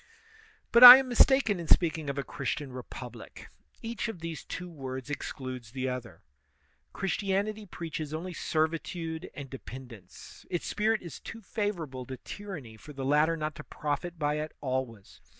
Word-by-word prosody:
But 235 +1 +7
I 250 +1 +15
am 265 -1 -1
mistaken 245 -5 +4
in 170 - -6
speaking 160 -4 +3
of 140 - -3
a 140 - -1
Christian 140 -2 -4
repub 125 -1 -8
lie; - - -10 0.5
each 230 +1 -3
of 225 -4 -5
these 165 -2 -6
two 180 - -6
words 130 -4 -7
excludes 130 -5 -6
the 130 -1 -2
other. 125 -2 -7 0.7
Chris 195 - -2
tianity 205 +1 -2
preaches 160 -3 -5
only 170 +4 -5
servitude 160 +1 -2
and 140 -2 -7
dependence. 125 -6 -11
Its 175 - -2
spirit 215 0 0
is 170 - -8
too 225 0 -9
favorable 170 - -3
to 130 -1 -6
tyranny 160 - -8
for 150 +7 -12
the 135 -1 -5
latter 150 +4 +3
not 155 0 -3
to 150 - -8
profit 155 +5 -4
by 150 -1 0
it 155 0 -5
always. 130 -6 -4
155 Hz, 165 wpm, -29 LUFS, 130-185 Hz, 0.7 s, I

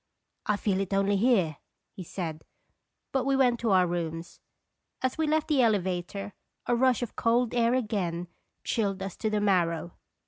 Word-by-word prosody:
" - - -53
I - - -1
feel 195 -2 0
it 195 0 -1
only 195 +1 +2
here," 195 - +2 0.3
he - - -9
said; 160 -3 -5 0.7
but 265 -2 +1
we 275 +1 +1
went 250 -3 +3
to 230 - 0
our 185 -2 +5
rooms. 170 -1 -4 0.6
As 260 - 0
we 320 -1 0
left 310 0 +1
the 290 -4 +3
elevator, 195 -2 0 0.3
a 240 - +2
rush 255 0 +3
of 235 - -6
cold 235 +1 +2
air 240 0 +3
again 185 -8 -2 0.4
chilled 195 -4 -1
us 195 -2 -5
to 220 - -1
the 210 0 0
marrow. 175 -4 +1
205 Hz, 175 wpm, -28 LUFS, 180-240 Hz, 0.7 s, our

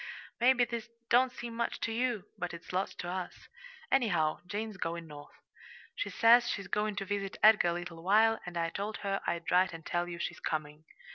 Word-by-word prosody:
Maybe 245 0 +5
this 235 -1 -5 0.2
don't 250 +1 +5
seem 240 -2 -7
much 235 0 -2
to 230 - -1
you, 235 -3 -1
but 175 -1 -4
it's 170 - -11
lots 190 +2 -1
to 175 - -6
us. 180 0 -5 0.4
Anyhow, 175 -12 +2
Jane's 210 +2 -4
going 170 -1 -3
North. 145 -2 -12 0.6
She - - -3
says 240 +1 +5
she's 195 -2 -3
going 210 0 -1
to 195 - -3
visit 200 -1 -3
Edgar 215 -4 +7
a 170 - +2
little 170 -1 -6
while, 220 +5 +4
and 175 -1 -6
I 165 0 0
told 205 +2 -4
her 195 0 0
I'd 170 -1 -2
write 180 0 +4
and 165 -1 -9
tell 175 0 -1
you 170 - -5
she's 175 0 -4
coming. 155 0 -4
195 Hz, 200 wpm, -31 LUFS, 170-225 Hz, 0.6 s, Edgar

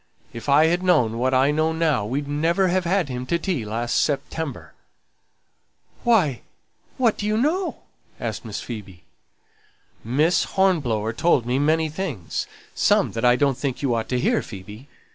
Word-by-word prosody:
If 115 +4 -6
I 150 +3 +6
had 175 +2 +1
known 125 -12 +2
what 130 +2 +1
I 135 +2 +3
know 155 +2 +1
now 155 -10 +1
we'd 140 +5 -2
never 165 +6 +1
have 185 0 0
had 180 -1 +1
him 125 -1 -5
to 170 - +1
tea 170 - -2
last 115 +3 -2
September." 145 -1 -3 1.3
"Why, 185 - +2 0.6
what 235 -4 +2
do 210 - -2
you 215 0 +1
know?" 335 - -1 0.4
asked - - -4
Miss - - -5
Phoebe. 100 -7 -8 1.0
"Miss 150 +9 +2
Hornblower 125 - +1
told 125 -1 +2
me 125 +2 0
many 160 +2 +2
things; 150 - -4 0.3
some - - +2
that 115 - -4
I 120 0 +5
don't 140 -1 +1
think 140 -1 -3
you 130 -3 +1
ought 115 -1 -2
to 125 - 0
hear, - - +2
Phoebe. 105 +5 -10
145 Hz, 160 wpm, -23 LUFS, 120-170 Hz, 1.3 s, I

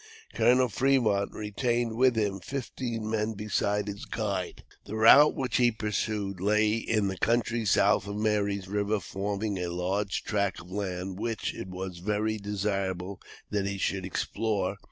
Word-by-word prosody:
Colonel 125 +1 +4
Fremont 115 -5 +2
retained 115 +2 -1
with 125 0 +4
him 100 -3 0
fifteen 120 -1 -4
men 110 0 -1
besides 105 0 -1
his 100 0 -6
guide. 100 -5 -3 0.2
The 110 - -6
route 125 +7 +7
which 130 -3 -1
he 120 -2 +4
pursued 105 -3 -2
lay 105 +2 +3
in 110 -2 0
the 95 -1 -3
country 115 +1 +1
south 100 - +3
of 100 - -4
Mary's 100 -2 0
River 105 +2 0
forming 100 +1 -3
a 90 - -2
large 95 +3 -1
tract 100 -2 -1
of 90 +1 -13
land, 95 -1 -4
which 115 -1 -2
it - - -7
was 90 -1 -6
very 105 +3 -1
desirable 100 -2 -2 0.3
that 100 -2 0
he 100 0 -3
should 95 0 -1
explore. 100 +1 -1
105 Hz, 155 wpm, -28 LUFS, 100-110 Hz, 0.3 s, route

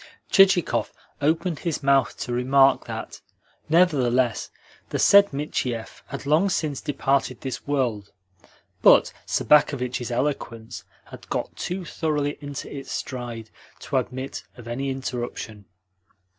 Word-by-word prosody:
Chichikov 195 -3 +4 0.3
opened 160 +2 +1
his 165 -4 -3
mouth 135 -2 +3
to 120 - -4
remark 135 +2 +3
that, - - -7 0.5
nevertheless, 130 -8 +2 0.4
the - - -2
said 200 0 +6
Michiev 130 -5 -3
had - - -7
long 155 +7 +3
since 150 -6 -1
departed 135 -3 0
this 130 0 -5
world; 120 -8 -1 0.7
but - - +6
Sobakevitch's 125 -4 +2
eloquence 120 -3 -3 0.3
had - - -12
got - - -3
too 180 0 -4
thoroughly 150 -4 -2
into 145 -1 -6
its 135 - -7
stride 120 -4 -5 0.3
to - - -1
admit 130 +2 -4
of 120 -2 -11
any 135 +4 -3
interruption. 120 -5 -5
135 Hz, 115 wpm, -24 LUFS, 125-150 Hz, 0.7 s, said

